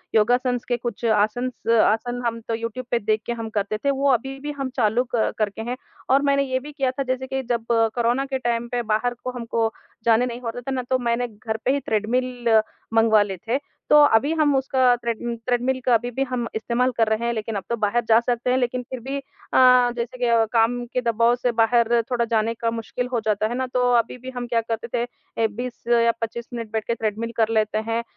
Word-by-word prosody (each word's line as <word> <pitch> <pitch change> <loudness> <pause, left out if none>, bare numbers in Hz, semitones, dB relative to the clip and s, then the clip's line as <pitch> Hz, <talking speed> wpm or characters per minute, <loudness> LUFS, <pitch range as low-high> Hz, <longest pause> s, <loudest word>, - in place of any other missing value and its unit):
योगासन्स 245 +3 +2
के 245 - 0
कुछ 240 0 -5
आसनस 225 +4 0 0.2
आसन 245 +3 0
हम 230 0 -1
तो 230 - -1
यूट्यूब 230 +2 -5
पे 240 - +2
देख 215 +1 0
के 240 - -2
हम 225 -1 -5
करते 200 +2 -2
थे 280 +6 0
वो 275 +1 +1
अभी-भी 270 +4 -2
हम 270 -1 -2
चालू 235 +2 +2
क 225 - +1
करके 215 0 -1
हैं। 245 +2 -4 0.3
और 270 +2 +5
मैंने 280 -1 +2
ये 260 -1 -1
भी 295 +3 -9
किया 270 -3 0
था 275 +2 -3
जैसे 260 0 -2
कि 265 0 -2
जब 235 -1 0 0.3
कोरोना 240 +3 +1
के 270 -1 -2
टाइम 240 -1 -1
पे 245 -1 0
बाहर 220 +2 0
को 255 - -3
हमको 230 -1 -1 0.3
जाने 230 +1 +4
नहीं 245 0 -5
होता 245 0 -5
था 270 - -5
ना 255 -1 -1
तो 260 - +3
मैंने 240 0 0
घर 220 0 -5
पे 260 - +4
ही 280 - +1
ट्रेडमिल 240 0 +1 0.3
मँगवा 225 -2 +5
लिए 195 -2 -5
थे। 250 +4 +2 0.3
तो 300 - +7 0.2
अभी 280 +8 +3
हम 290 -2 +4
उसका 260 -2 +3
ट्रेड 235 -1 -2 0.3
ट्रेडमिल 250 +1 +1
का 250 - +4
अभी 240 +2 +2
भी 270 +3 -1
हम 245 -2 -2
इस्तेमाल 240 +3 0
कर 225 -1 +3
रहे 220 +2 0
हैं। 235 - 0
लेकिन 220 -1 -4
अब 195 - -3
तो 235 - +1
बाहर 215 +2 +1
जा 225 +1 +7
सकते 240 +1 -1
हैं 255 - +3
लेकिन 250 0 0
फ़िर 255 +1 -7
भी 270 +3 -4
अ, 275 -1 -3 0.4
जैसे 235 +2 -4
कि 235 -2 +3
काम 240 +1 +2
के 250 - +1
दबाव 235 0 +2
से 245 0 0
बाहर 235 +1 +3
थोड़ा 235 -1 +1
जाने 225 0 +1
का 230 0 -2
मुश्किल 230 +2 -4
हो 235 - +2
जाता 215 0 +1
है 240 - -3
ना, 260 - -1
तो 250 0 +1
अभी-भी 250 +2 -2
हम 245 -1 -3
क्या 230 -1 +1
करते 230 +1 -4
थे 240 0 +1 0.4
ए - - +4
20 240 +3 -7 0.2
या 230 - +4
25 230 +1 -4
मिनट 230 -3 -5
बैठ 220 -1 -1
के 235 - 0
ट्रेडमिल 220 +1 -2
कर 225 -1 +3
लेते 215 0 -1
हैं। 230 +1 0
235 Hz, 230 wpm, -23 LUFS, 225-255 Hz, 0.4 s, तो